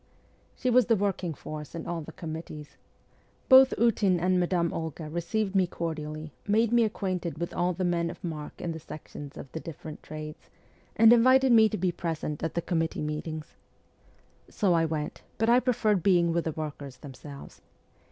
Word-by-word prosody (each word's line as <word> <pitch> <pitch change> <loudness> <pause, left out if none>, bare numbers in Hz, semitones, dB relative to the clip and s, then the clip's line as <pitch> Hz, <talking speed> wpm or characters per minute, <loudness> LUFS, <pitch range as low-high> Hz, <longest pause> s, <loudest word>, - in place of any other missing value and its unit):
She 255 - 0
was 250 +1 +5
the 230 - +4
working 190 -5 -1
force 150 +1 -8
in 165 - -5
all 170 -1 -3
the 160 - -9
committees. 155 -2 -8 0.7
Both 265 0 +8
Ootin 205 -6 +3
and 180 +1 +2
Madame 175 -1 +1
Olga 160 -1 -5
received 180 +6 -2
me 190 -2 +3
cordially, 155 -2 -5 0.2
made 220 +2 +3
me 240 -1 +5
acquainted 185 -6 -3
with 170 +2 -4
all 180 +1 +1
the 185 +2 -3
men 170 -1 +1
of 170 - -10
mark 155 -4 -6
in 170 - -3
the 160 - -6
sections 145 -2 -9
of 135 - -9
the 160 - -5
different 155 -1 -9
trades, 155 0 -9 0.5
and 225 +1 +8
invited 260 +2 +5
me 220 -2 +7
to 215 - -3
be 180 0 +1
present 160 -3 -4
at 165 - -3
the 170 - -1
committee 165 -3 -1
meetings. 150 +1 -5 1.0
So 195 -5 +1
I 165 -1 +3
went, 155 -2 -3 0.2
but 225 +1 +1
I 240 +1 +6
preferred 220 -6 +1
being 170 -2 +3
with 170 0 0
the 160 - 0
workers 145 -4 -6
themselves. 140 +1 -11
170 Hz, 180 wpm, -28 LUFS, 155-200 Hz, 1.0 s, Both